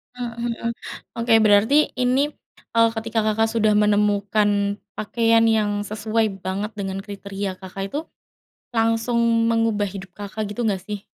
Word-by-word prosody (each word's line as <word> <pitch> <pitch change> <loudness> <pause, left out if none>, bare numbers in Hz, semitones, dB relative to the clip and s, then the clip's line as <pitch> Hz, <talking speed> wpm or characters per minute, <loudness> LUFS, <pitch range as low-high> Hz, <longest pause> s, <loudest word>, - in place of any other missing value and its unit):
Mmm, 245 -1 -4
mhm, 235 -1 -2 0.5
oke, 230 0 +2
berarti 215 +9 +4
ini, 260 +4 +2 0.4
eee, 230 0 +5
ketika 225 0 -2
Kakak 220 +1 +2
sudah 220 -2 +2
menemukan 205 0 +2 0.2
pakaian 230 +1 +2
yang 210 -2 +1
sesuai 215 -1 -1
banget 195 +4 -3
dengan 195 -1 -3
kriteria 200 -2 -5
Kakak 190 +1 -6
itu, 295 - -1 0.8
langsung 230 +1 +1 0.3
mengubah 225 -3 +1
hidup 190 -1 -8
Kakak 205 +2 -5
gitu 230 +3 -2
enggak 190 -3 -1
sih? 205 0 -6
215 Hz, 135 wpm, -22 LUFS, 200-230 Hz, 0.8 s, eee